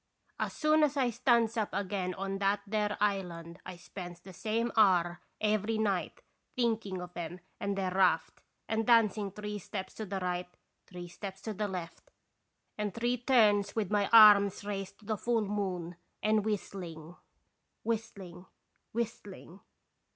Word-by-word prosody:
As - - -2
soon 310 0 +3
as 295 -1 +2
I 255 -3 +2
stands 235 -1 +2
up 215 -2 0
again 185 -2 -2
on 195 0 -3
that 200 +1 +1
there 210 0 -1
island 180 -4 -2
1 185 -1 -7
spends 175 0 -9
the 190 +1 -12
same 225 +5 -1
hour 175 -5 +4 0.2
every 215 +1 +1
night 200 -4 -1 0.3
thinking 225 -6 0
of 180 0 -8
'em 175 +1 -5 0.2
and 200 0 -2
their 190 -1 -1
raft, 180 -4 +2 0.3
and 220 0 -1
dancing 215 -4 +4
three 210 +1 -6
steps 190 0 -6
to 220 - -6
the 195 0 -3
right, 180 -1 -2 0.4
three 180 -1 -8
steps 190 +2 -8
to 220 - -3
the 210 +1 -2
left, 180 - -7 0.7
and 210 -2 -2
three 240 +2 0
turns 215 -5 +3
with 210 -4 -1
my 205 -1 +2
arms 205 -3 +8
raised 195 -1 -4
to - - -17
the 215 0 -1
full 230 +1 +1
moon, 185 -4 -3 0.3
and 215 -1 +2
whistling, 175 -6 -5 0.7
whistling, 200 -6 -4 0.5
whistling. 210 -5 -5
200 Hz, 150 wpm, -31 LUFS, 185-220 Hz, 0.7 s, arms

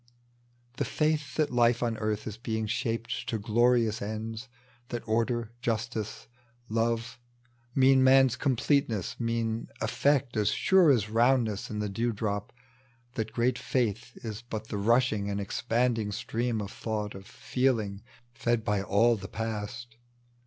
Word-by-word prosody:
The - - 0
faith 150 -3 0
that 155 -2 +1
life 120 0 +3
on 115 -1 0
earth 110 -1 -1
ia 110 - -4
being 110 -2 -2
shaped 115 +2 -2
To 115 - 0
glorious 115 +1 +2
ends, 110 +3 -5 0.4
that 120 -1 -5
order, 115 +1 0
justice, 115 -2 -3 0.4
love 115 +1 -1 0.6
Mean 130 0 +5
man's 130 -1 +6
completeness, 130 - 0
mean 115 -1 -1
effect 130 +3 +1
as 105 -1 +3
sure 190 -4 +4
As 110 -6 +2
roundness 115 -3 +2
in 105 - -4
the 105 0 -1
dew 115 +4 -1
drop 105 -1 -3 0.3
— 120 -1 -35
that 110 -3 -3
great 120 +2 +1
faith 120 -2 -1
Is 110 0 -5
but 110 -2 -6
the 105 - -3
rushing 110 -1 +2
and 100 0 -2
expanding 115 +2 0
stream 115 +2 -2
Of 100 -1 -6
thought, 105 -2 -3
of 95 +1 -10
feeling, 110 -8 -1 0.3
fed 120 -1 0
by 105 -1 +1
all 110 +5 +3
the 95 -1 -7
past. 115 +3 -5
115 Hz, 145 wpm, -29 LUFS, 110-120 Hz, 0.6 s, man's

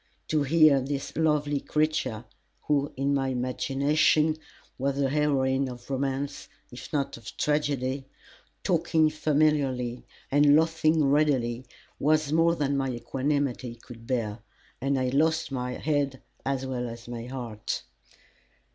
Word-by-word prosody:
To 155 -1 +2
hear 150 -1 +5
this 135 +1 -4
lovely 150 -2 +1
creature, 150 -7 -1 0.4
who, 145 -1 +1
in 140 +1 +1
my 135 -1 +1
imagination, 140 +5 +2 0.4
was 140 +1 0
a 135 -1 +2
heroine 135 -2 +1
of 120 -1 -10
romance, 135 +1 -2 0.2
if 125 - -10
not 140 -5 -1
of 115 -2 -11
tragedy, 140 -3 0 0.6
talking 160 -3 +2
familiarly 145 -5 +1 0.3
and 145 +1 +6
laughing 160 -1 +3
readily 130 -4 +1 0.3
was 155 0 +2
more 165 +1 +4
than 140 -3 0
my 135 -1 0
equanimity 130 0 -2
could 115 -1 -13
bear, 115 -4 -1 0.4
and 135 0 +1
I 130 -1 0
lost 160 +3 +1
my 125 -1 -2
head 140 -2 -1 0.2
as 135 -1 -1
well 125 -2 -3
as 115 +1 -10
my 120 0 -6
heart. 120 -5 -4
140 Hz, 130 wpm, -27 LUFS, 125-150 Hz, 0.6 s, and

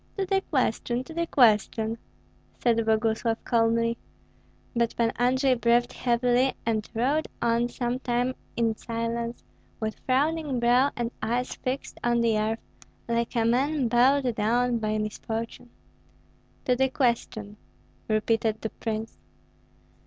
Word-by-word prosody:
"To 390 - 0
the 385 +1 +1
question, 250 - 0
to 320 - -11
the 335 +1 -1
question!" 225 -2 +3 0.6
said 230 -2 +2
Boguslav, 225 +1 +1
calmly. 230 0 +2 0.8
But 235 -1 +1
Pan 230 -1 +2
Andrei 260 +2 +3
breathed 240 0 +2
heavily, 245 +1 +2
and 220 -2 -1
rode 275 +7 +1
on 235 0 +1
some 245 0 -2
time 245 0 0 0.2
in 225 -2 +1
silence, 230 +1 -4 0.4
with 220 -1 -3
frowning 285 0 +1
brow 245 +3 +4
and 240 -1 -2
eyes 240 +3 -1
fixed 260 +2 -4
on 240 0 +2
the 230 -1 +2
earth, 220 +1 -1 0.5
like 235 +1 -1
a 230 -1 +2
man 260 +2 +1
bowed 250 +2 +4
down 235 +3 +1
by 215 -1 -1
misfortune. 220 +2 -4 1.0
"To 250 - +3
the 265 +1 +2
question!" 235 -5 -1 0.5
repeated 220 0 +1
the 220 - -2
prince. 225 0 -5
235 Hz, 130 wpm, -27 LUFS, 225-255 Hz, 1.0 s, brow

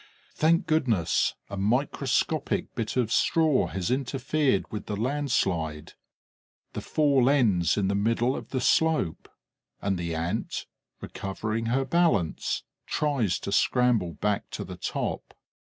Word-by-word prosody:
Thank 165 +2 +2
goodness! 120 - +1
A 100 - -6
microscopic 135 +7 0
bit 115 +1 -3
of 120 -3 +1
straw 160 -1 +3
has 95 +3 -3
interfered 135 -2 0
with 105 -2 -6
the 105 - -2
landslide. 100 - -1 0.8
The - - -4
fall 140 -4 +3
ends 105 - +3
in 100 -2 +1
the 100 - +1
middle 115 +5 +1
of - - -7
the 130 - -2
slope; 160 - +1 0.5
and 95 -2 -1
the 85 -1 -3
Ant, 85 +7 -3 0.4
recovering 110 +4 -4
her 135 +3 +1
balance, 150 - +1 0.2
tries 135 - 0
to - - -4
scramble 115 -5 +2
back 105 +5 -1
to - - -4
the - - -8
top. - - -4
115 Hz, 130 wpm, -27 LUFS, 100-140 Hz, 0.8 s, straw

